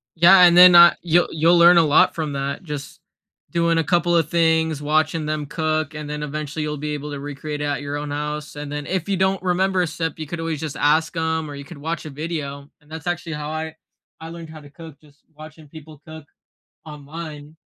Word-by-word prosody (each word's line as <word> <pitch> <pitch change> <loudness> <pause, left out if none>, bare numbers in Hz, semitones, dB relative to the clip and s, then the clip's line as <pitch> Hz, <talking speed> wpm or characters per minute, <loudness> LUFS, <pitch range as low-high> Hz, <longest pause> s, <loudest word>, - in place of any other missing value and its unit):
Yeah, 180 +3 +7
and 175 -1 +6
then 180 0 +9
I 170 0 +8
you'll 175 0 +2
you'll 165 +2 +3
learn 170 +1 +7
a 170 - +6
lot 160 +5 +3
from 155 -3 -3
that. 140 +5 -4
Just 150 +1 -8 0.5
doing 170 -1 +1
a 165 - +2
couple 175 +1 +1
a 165 - +4
things, 160 -1 +1
watching 155 +1 0
them 155 -1 -3
cook, 155 +1 -2
and 150 -1 -7
then 150 0 -4
eventually, 150 +1 -5
you'll 150 0 -4
be 150 +1 -4
able 150 0 -6
to 145 - -6
recreate 145 +1 -6
it 150 - -2
at 145 0 -2
your 145 0 -5
own 145 0 -5
house, 150 +1 -5
and 145 0 -7
then, 145 0 -5
if 185 -1 -3
you 195 -2 -1
don't 190 0 0
remember 185 +1 +1
a 175 - 0
step, 165 -1 -4
you 155 - -6
could 170 +3 -6
always 165 -2 -3
just 155 -3 -5
ask 160 +3 +1
'em 160 -1 -2
or 145 - -8
you 140 - -8
could - - -12
watch 160 +2 -5
a 155 - -6
video, 145 -2 -6
and 150 - -24
that's 160 +1 -8
actually 175 -1 -3
how 150 0 -5
I 160 0 -5 0.4
I 160 0 -9
learned 165 -1 -10
how 155 0 -11
to 145 - -15
cook- 150 0 -13
just 145 -1 -23
watching 155 0 -13
people 155 -1 -13
cook 160 -2 -11 0.6
online. 150 0 -10
155 Hz, 230 wpm, -21 LUFS, 150-170 Hz, 0.6 s, then